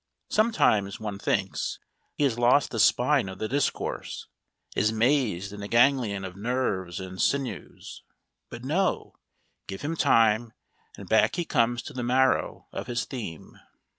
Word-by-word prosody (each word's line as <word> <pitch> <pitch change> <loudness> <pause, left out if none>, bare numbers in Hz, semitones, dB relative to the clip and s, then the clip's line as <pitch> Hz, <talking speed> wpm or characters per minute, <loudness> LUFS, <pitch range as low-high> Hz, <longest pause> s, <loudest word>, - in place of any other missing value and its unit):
Sometimes, 115 - +2
one 105 -3 -5
thinks, 95 -1 -1 0.4
he - - -1
has 125 -4 +1
lost 125 +4 +4
the 115 - -3
spine 125 0 +3
of 95 - -8
the 110 - -3
discourse, 140 +4 -2 0.5
is 110 - +2
mazed 110 -5 +1
in 105 - -8
a 100 - -5
ganglion 115 -4 +2
of 90 -1 -8
nerves 100 -6 -2
and 95 0 -6
sinews. 140 -2 -3 0.5
But 120 0 -9
no! 180 +8 0 0.5
give 95 - -6
him 160 +3 -2
time 115 -4 +3 0.4
and - - -10
back - - +3
he 175 -1 -2
comes 120 -4 +1
to 145 - -9
the 130 - -4
marrow 130 +2 +1
of - - -6
his 120 -1 -2
theme! 110 - -8
120 Hz, 150 wpm, -27 LUFS, 100-130 Hz, 0.5 s, lost